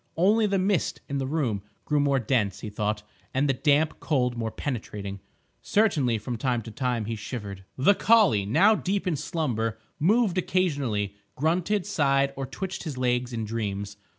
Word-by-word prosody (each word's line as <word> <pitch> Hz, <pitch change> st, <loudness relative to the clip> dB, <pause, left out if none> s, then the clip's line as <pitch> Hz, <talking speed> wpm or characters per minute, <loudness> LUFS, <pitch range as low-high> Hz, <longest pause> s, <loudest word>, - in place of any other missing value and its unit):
Only 210 Hz, +5 st, +4 dB
the 200 Hz, -1 st, +1 dB
mist 190 Hz, -1 st, +1 dB
in 140 Hz, 0 st, -2 dB
the 135 Hz, -, -2 dB
room 130 Hz, -9 st, -1 dB, 0.2 s
grew 150 Hz, -1 st, +1 dB
more 140 Hz, -1 st, +3 dB
dense, 110 Hz, -6 st, 0 dB
he 105 Hz, -, -6 dB
thought, 105 Hz, 0 st, -2 dB, 0.3 s
and 140 Hz, +2 st, +2 dB
the 135 Hz, -, +3 dB
damp 150 Hz, +3 st, +2 dB
cold 125 Hz, -6 st, 0 dB
more 115 Hz, -1 st, -2 dB
penetrating. 105 Hz, -6 st, -5 dB, 0.4 s
Certainly, 150 Hz, -, +2 dB
from 115 Hz, +2 st, -5 dB
time 120 Hz, -2 st, 0 dB
to 110 Hz, -, -8 dB
time, 125 Hz, -3 st, -1 dB
he 115 Hz, +1 st, -3 dB
shivered. 100 Hz, -4 st, -6 dB
The 140 Hz, +10 st, +5 dB
collie, 200 Hz, -, +4 dB
now 185 Hz, -, +5 dB
deep 200 Hz, -1 st, -1 dB
in 180 Hz, -4 st, +1 dB
slumber, 125 Hz, -8 st, -2 dB, 0.2 s
moved 195 Hz, +2 st, +3 dB
occasionally,—grunted, 160 Hz, -, -1 dB
sighed, 140 Hz, -2 st, +2 dB
or 135 Hz, -1 st, -4 dB
twitched 190 Hz, +7 st, -5 dB
his 150 Hz, -7 st, -5 dB
legs 125 Hz, 0 st, 0 dB
in 115 Hz, -2 st, -3 dB
dreams. 105 Hz, -2 st, -3 dB
135 Hz, 165 wpm, -26 LUFS, 110-165 Hz, 0.4 s, The